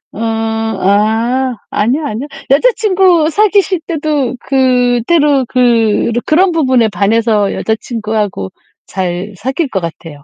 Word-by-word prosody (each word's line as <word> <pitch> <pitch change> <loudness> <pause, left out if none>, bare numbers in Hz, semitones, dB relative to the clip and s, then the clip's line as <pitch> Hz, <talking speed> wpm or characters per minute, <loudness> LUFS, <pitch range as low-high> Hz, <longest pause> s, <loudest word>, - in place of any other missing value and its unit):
음 - - -7
아 225 +2 0 0.2
아니요, 260 +9 0
아니요. 245 +2 -4 0.2
여자친구 370 - +3
사귀실 395 0 +2
때도 295 -6 -1
그때도 260 +2 +2
그렇 235 -3 +2
그런 355 +4 +3
부분에 260 -8 +2
반해서 210 0 +1
여자친구하고 215 - -3 0.4
잘 185 +2 -4
사귈 265 - -2
것 190 - -2
같아요. 165 -3 -8
240 Hz, 250 characters per minute, -13 LUFS, 215-295 Hz, 0.4 s, 여자친구